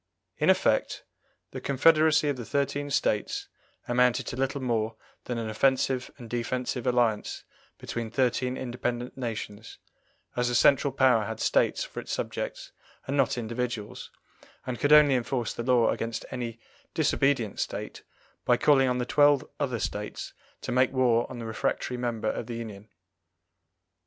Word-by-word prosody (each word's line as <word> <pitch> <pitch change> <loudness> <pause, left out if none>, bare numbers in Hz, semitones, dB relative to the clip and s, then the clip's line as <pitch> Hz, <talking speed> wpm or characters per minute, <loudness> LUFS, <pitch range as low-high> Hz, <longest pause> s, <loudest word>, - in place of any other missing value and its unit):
In - - +3
effect, - - +2 0.5
the - - -6
confederacy 155 +2 +4
of 145 - +1
the 125 - -6
thirteen 140 +2 -1
States 105 -6 0 0.4
amounted 125 0 +2
to - - -5
little 135 +2 -1
more 115 -3 -1 0.3
than 125 - -3
an 115 -1 -3
offensive 130 +3 +1
and 120 - -10
defensive 125 +1 -2
alliance 120 -4 +1 0.3
between 115 -1 -5
thirteen 125 +1 0
independent 120 -1 -3
nations, 115 -3 -6 0.6
as 125 0 +1
the 120 - 0
central 140 +3 +4
power 130 -5 +3
had 110 +1 -5
States - - +2
for - - -7
its - - -7
subjects - - -4 0.3
and 135 - -2
not 135 -3 +2
individuals, 115 -2 -4 0.6
and 125 -2 -4
could 145 - +1
only 150 -2 +8
enforce 120 -2 -1
the - - -5
law 120 -1 +3
against 115 0 -3
any 120 -2 -5 0.4
disobedient 135 -6 +1
State - - -4 0.4
by - - +3
calling 135 -3 +4
on 125 - 0
the 125 - -1
twelve 145 0 +4
other 130 -5 -1
States 105 -1 -4 0.3
to - - -4
make 130 0 +3
war 125 -3 +2
on 130 - -7
the 115 - -6
refractory 115 +2 -2
member 120 -3 -1
of 115 - -5
the 120 - -5
union. 110 -2 -8
125 Hz, 150 wpm, -27 LUFS, 115-130 Hz, 0.6 s, only